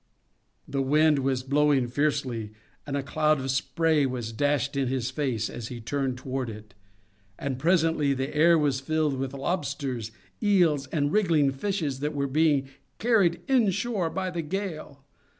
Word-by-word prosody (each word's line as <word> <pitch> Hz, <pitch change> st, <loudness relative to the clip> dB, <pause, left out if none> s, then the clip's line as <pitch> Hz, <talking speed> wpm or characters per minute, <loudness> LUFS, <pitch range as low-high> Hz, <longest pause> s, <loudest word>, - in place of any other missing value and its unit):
The 140 Hz, -, -1 dB
wind 150 Hz, +2 st, +3 dB
was 130 Hz, -1 st, 0 dB
blowing 140 Hz, -1 st, +2 dB
fiercely, 130 Hz, -5 st, -1 dB, 0.3 s
and 140 Hz, 0 st, -2 dB
a 140 Hz, -, -2 dB
cloud 155 Hz, +1 st, +1 dB
of 135 Hz, 0 st, -2 dB
spray 150 Hz, +2 st, +1 dB
was 120 Hz, -3 st, -4 dB
dashed 145 Hz, +3 st, 0 dB
in 135 Hz, -2 st, 0 dB
his 130 Hz, -1 st, -2 dB
face 130 Hz, -6 st, -1 dB
as 115 Hz, -, -7 dB
he 120 Hz, -1 st, -7 dB
turned 130 Hz, +2 st, -2 dB
toward 130 Hz, -1 st, -4 dB
it, 110 Hz, -1 st, -10 dB, 0.6 s
and 135 Hz, -2 st, -3 dB
presently 160 Hz, -2 st, +2 dB
the 135 Hz, +3 st, -3 dB
air 165 Hz, +2 st, +5 dB
was 145 Hz, -4 st, +1 dB
filled 155 Hz, +1 st, 0 dB
with 135 Hz, 0 st, -3 dB
lobsters, 140 Hz, -, -3 dB, 0.3 s
eels, 170 Hz, -9 st, +3 dB
and 145 Hz, 0 st, 0 dB
wriggling 165 Hz, -9 st, +3 dB
fishes 150 Hz, -2 st, -2 dB
that 150 Hz, +1 st, -2 dB
were 140 Hz, -1 st, 0 dB
being 140 Hz, -1 st, +2 dB, 0.3 s
carried 210 Hz, -8 st, +2 dB
inshore 225 Hz, -, +1 dB
by 185 Hz, +2 st, -3 dB
the 170 Hz, -1 st, -2 dB
gale. 160 Hz, -5 st, -5 dB
145 Hz, 155 wpm, -27 LUFS, 130-160 Hz, 0.6 s, air